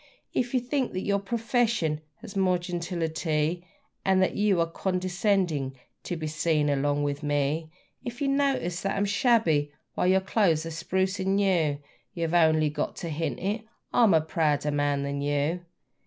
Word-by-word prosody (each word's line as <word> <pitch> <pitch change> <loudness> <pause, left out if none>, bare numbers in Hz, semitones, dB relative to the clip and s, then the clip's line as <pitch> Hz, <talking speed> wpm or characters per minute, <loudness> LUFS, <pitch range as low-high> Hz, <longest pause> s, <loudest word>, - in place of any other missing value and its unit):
If 245 +1 0
you - - +4
think 255 +1 -1
that 185 - -3
your 200 0 +1
profession 225 - 0 0.2
has 225 -3 -9
the 195 - -1
more 185 -1 +3
gentility, 170 -1 -2 0.4
And 190 -1 +3
that 185 - +2
you 205 -3 +2
are 165 - +3
condescending 180 -5 0 0.3
to 175 - -2
be 160 - -4
seen 155 -1 +1
along 145 +1 +1
with 145 0 -2
me; 145 +2 0 0.3
If 240 +1 -6
you 285 - 0
notice 275 -11 +1
that 195 0 -1
I'm 200 - +2
shabby 200 - +2 0.2
while - - 0
your 190 +1 +5
clothes 185 -5 +2
are 165 - -5
spruce 190 +4 -1
and 190 +1 +1
new 175 -8 +2 0.4
You 170 - -2
have 160 - -4
only 160 -3 +4
got 150 0 -3
to 170 - -5
hint 160 +1 -2
it: 205 +4 -1 0.3
I'm 225 -8 +5
a 160 - +5
prouder 150 -2 0
man 145 -1 +1
than 140 0 -3
you! 145 +5 0
175 Hz, 175 wpm, -27 LUFS, 150-195 Hz, 0.4 s, your